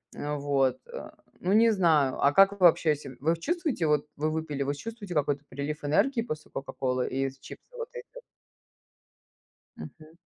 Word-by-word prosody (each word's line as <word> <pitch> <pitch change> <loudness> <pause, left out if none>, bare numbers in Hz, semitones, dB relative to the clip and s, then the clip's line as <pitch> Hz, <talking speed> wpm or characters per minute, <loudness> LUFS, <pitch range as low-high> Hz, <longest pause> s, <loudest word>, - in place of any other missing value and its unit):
Э, 150 0 -3
вот, 140 -2 +1
э, - - -7 0.3
ну, 185 - 0
не 225 +1 +6
знаю. 160 -9 +2
А 140 - +5
как 195 +3 +7
вы 200 - -11
вообще 165 -3 +5
се 135 -3 -10
Вы 165 +3 +2
чувствуете, 280 - -1
вот, 150 -1 +2
вы 155 +2 0
выпили, 155 -3 -2
вы 140 +1 -2
чувствуете 210 +3 -7
какой-то 145 -2 0
прилив 145 +3 -5
энергии 230 - +2
после 155 -9 -6
"Кока-Колы" 130 -2 -2
и 135 +1 -1
из 135 0 -10
чипсов - - -13
вот 470 0 -5
этих? 480 -1 -8 1.7
Мгм. 155 0 -12
155 Hz, 170 wpm, -28 LUFS, 140-195 Hz, 1.7 s, как